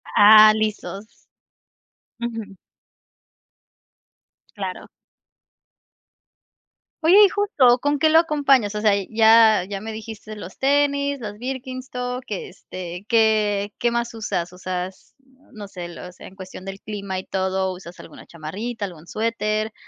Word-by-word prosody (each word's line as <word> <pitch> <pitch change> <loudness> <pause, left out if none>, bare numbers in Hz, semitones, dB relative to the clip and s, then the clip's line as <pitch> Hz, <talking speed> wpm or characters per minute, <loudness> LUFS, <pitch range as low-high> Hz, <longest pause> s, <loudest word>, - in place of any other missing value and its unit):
Ah, 215 +1 +9
lisos. 215 -1 -3 1.1
Ujú. 225 -4 -5 2.0
Claro. 190 -2 -6 2.2
Oye, 335 +4 +6
¿y - - +3
justo 290 - +3
con 290 +3 0
qué 315 +2 +3
lo 320 - +7
acompañas? 275 -9 +2
O 210 - -2
sea, 215 - +4 0.2
ya 220 -2 +5
ya 200 -1 -5
me 220 - -6
dijiste 220 0 -9
los 190 -3 -10
tenis, 280 0 +1
los 210 -3 -7
Birkenstock 255 0 -5
que, 205 - -5
este, 180 0 -9
¿qué 215 -3 +2
qué 240 - +2
más 235 0 -2
usas? 180 -6 -3
usas 185 0 -6 0.4
no 205 -2 -9
sé, 180 -3 -8
los, 180 +1 -11
en 190 - -12
cuestión 185 -1 -10
del 195 +1 -7
clima 200 -3 -5
y 185 - -6
todo, 190 0 -1
¿usas 180 -1 -12
alguna 160 - -13
chamarrita, 200 +8 -6
algún 170 -3 -11
suéter, 215 0 -2
215 Hz, 125 wpm, -22 LUFS, 190-240 Hz, 2.2 s, Ah